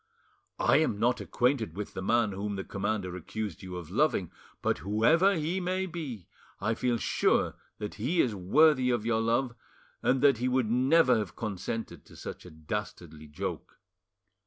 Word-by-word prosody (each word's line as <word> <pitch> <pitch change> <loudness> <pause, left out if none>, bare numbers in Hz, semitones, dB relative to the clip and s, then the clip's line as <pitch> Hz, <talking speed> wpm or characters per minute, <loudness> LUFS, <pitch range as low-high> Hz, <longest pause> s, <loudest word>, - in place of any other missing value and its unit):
I - - +4
am 155 -10 +1
not 120 +3 +2
acquainted 120 - 0
with 105 - -5
the - - -5
man 115 +2 +2
whom 100 +1 -3
the 95 - -4
commander 100 -2 -3
accused 100 +1 -5
you 90 -1 -7
of 85 -3 -8
loving, - - +1 0.3
but - - +1
whoever 120 - +3
he 165 +4 -1
may 185 +1 -1
be 150 - -6 0.3
I 105 +3 0
feel 120 +1 0
sure 110 - +1 0.2
that 105 -1 -5
he 160 +10 0
is 120 -8 +3
worthy 130 - +4
of 120 -3 0
your 115 -1 +1
love, 120 +2 +1 0.5
and 130 +1 +2
that 140 -5 +5
he 125 - 0
would 125 -3 +1
never 130 0 +4
have 105 -4 -5
consented 110 +1 -4
to - - -16
such - - -8
a - - -9
dastardly 80 -1 -6
joke. 75 0 -6
115 Hz, 170 wpm, -29 LUFS, 100-130 Hz, 0.5 s, that